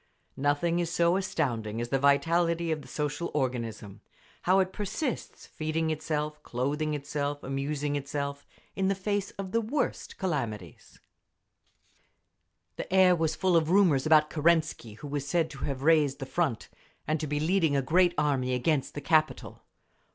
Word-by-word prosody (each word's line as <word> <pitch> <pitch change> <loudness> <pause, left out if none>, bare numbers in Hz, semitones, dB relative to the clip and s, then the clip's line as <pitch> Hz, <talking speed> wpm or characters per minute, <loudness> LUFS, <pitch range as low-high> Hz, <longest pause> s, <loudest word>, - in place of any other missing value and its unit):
Nothing 145 +5 +1
is 170 -2 -1
so 170 +1 +3
astounding 120 - -1
as 120 0 -3
the 135 - +1
vitality 165 +4 +2
of 155 -1 -1
the 130 - -13
social 150 +5 -3
organism—how 125 - -3
it 190 0 0
persists, 215 - -4
feeding 160 +1 -2
itself, 150 -1 -3
clothing 150 +4 -2
itself, 145 0 -3
amusing 140 +2 -2
itself, 140 0 -4 0.3
in 190 -1 0
the 195 - +1
face 200 +1 -2
of 195 -1 -5
the 230 - +2
worst 245 +4 -2
calamities…. 115 - -4 1.8
The - - -6
air 185 -1 +6
was 160 -2 0
full 185 -2 +2
of 160 -1 +3
rumours 175 -8 +4
about 155 -1 +5
Kerensky, 155 -7 +1
who 115 +7 -9
was 140 -1 -3
said 165 0 +1
to 140 - -6
have 135 -2 -4
raised 150 -3 +4
the 135 - -5
Front, 140 -5 -1 0.4
and 155 +1 0
to 155 - -3
be 145 +1 -1
leading 160 -2 +2
a 135 - +1
great 175 +5 +3
army 135 -4 +1
against 135 +2 0
the 145 - -4
capital. 155 +1 0
150 Hz, 155 wpm, -28 LUFS, 140-170 Hz, 1.8 s, air